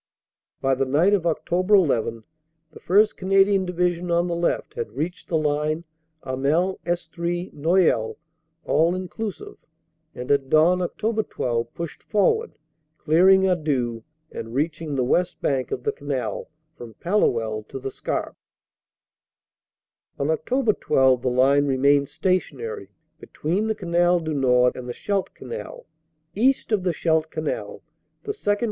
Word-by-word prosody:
"By 135 0 +2
the 135 0 0
night 160 +9 +3
of 190 -4 +1
Oct. 165 -2 -2
1 185 +1 +4
1 115 -3 -1 0.5
the - - -13
1st 210 +4 +3
Canadian 195 0 +3
Division, 180 0 -1
on 170 +1 +2
the 175 - -2
left, 170 0 -1
had 465 -1 -5
reached 175 +3 -4
the 165 - +1
line 155 +1 0 0.4
Hamel 150 +9 0
Estrees 175 +1 -3
Noyelles 150 -7 +2 0.5
(all 165 +2 +3
inclu 185 +4 -4
sive), - - -12 0.6
and 125 +2 -4
at 140 -2 +2
dawn, 165 +5 +4
Oct. 215 +5 -2
12, 120 -1 -2
pushed 170 -2 -6
forward, 445 - +1 0.4
clearing 185 +5 +5
Arleux 145 -11 0 0.3
and 115 +1 -7
reaching 155 +1 -2
the 130 - +1
west 175 +8 0
bank 130 -2 -1
of 125 - -4
the - - +1
Canal 130 -7 -4 0.3
from 115 -2 -11
Palluel 115 - 0
to - - -7
the 135 0 -5
Scarpe. - - -4 1.8
"On 140 - -1
Oct. 215 - 0
12 130 -2 +3
the 125 - 0
line 135 +3 +3
remained 140 +1 +3
stationary 410 - -2 0.3
between 185 +8 -2
the 220 - 0
Canal 175 -2 +2
du 160 -1 -3
Nord 125 -3 +3
and 125 -1 -7
the - - -3
Scheldt 200 -2 -2
Canal. - - -8 0.5
East 250 +5 +1
of 210 -3 +2
the 180 -1 0
Scheldt 160 -1 0
Canal 155 -1 -4 0.4
the 420 - -3
2nd. 205 - 0
165 Hz, 145 wpm, -23 LUFS, 135-185 Hz, 1.8 s, clearing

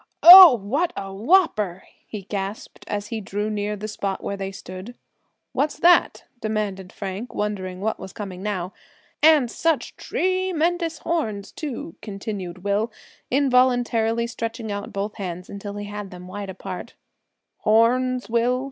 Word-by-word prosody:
"Oh! 355 -4 +12
what 275 - -1
a 195 -1 -5
whopper!" 215 - +2 0.2
he 210 -3 -7
gasped, 195 +1 -6
as 205 0 -4
he 225 -2 -4
drew 205 +2 -3
near 210 0 -2
the 210 +1 -6
spot 200 -2 -4
where 200 - -3
they 195 0 -5
stood. 190 +5 -9 0.6
"What's 295 +1 -1
that?" 350 +1 +4 0.2
demanded 205 -4 -3
Frank, 200 +4 -6
wondering 190 -3 -3
what 220 +1 -1
was 190 0 -8
coming 190 -3 -7
now. 190 -3 -3 0.5
"And 300 -6 +5
such 325 -2 -1
tre 370 0 -1
mendous 335 0 -1
horns, 215 -12 -2
too!" 265 - -6
continued 195 -3 -6
Will, 205 +3 0 0.4
involuntarily 245 -4 +2
stretching 230 -1 -5
out 205 0 -5
both 205 +2 -4
hands 180 -3 -6
until 200 0 -7
he 205 0 -5
had 205 -1 -6
them 180 0 -11
wide 200 +1 -6
apart. 190 -1 -7 0.6
"Horns, 250 +3 +2
Will?" 240 +2 +1
210 Hz, 145 wpm, -23 LUFS, 195-250 Hz, 0.6 s, Oh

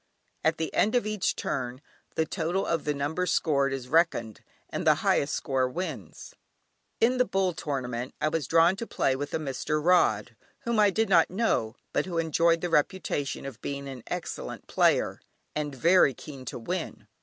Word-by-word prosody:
At 160 +1 +2
the 160 - -3
end 215 +4 +2
of 245 - +2
each 215 -3 0
turn 125 0 -3 0.4
the 160 - +2
total 175 +3 -1
of 165 -2 -1
the 150 - +1
numbers 160 +6 -1
scored 140 -5 +2
is 135 -2 -4
reckoned, 160 - +1 0.3
and - - -4
the - - +7
highest 140 - +2
score 130 -2 0
wins. 145 - -6 0.7
In 245 +3 +3
the - - +6
"Bull" 190 -5 0
tournament 130 -5 -4
I - - +1
was 155 -4 -2
drawn 165 +3 +5
to 230 - -5
play 135 - +1
with 145 +2 -4
a - - +2
Mr. 150 +1 -2
Rod, 125 - +3 0.3
whom 235 -2 0
I 205 -1 +6
did 220 +3 +1
not 170 -4 +5
know, 180 - 0 0.2
but - - 0
who 175 -2 -3
enjoyed 165 +1 +2
the 175 - -1
reputation 150 -4 0
of 135 -5 -8
being 140 0 -4
an 130 -2 -7
excellent - - -5
player, - - +2 0.3
and 145 -2 -2
very 165 -1 +4
keen 135 -4 -10
to - - -5
win. 160 - -4
155 Hz, 180 wpm, -28 LUFS, 135-180 Hz, 0.7 s, the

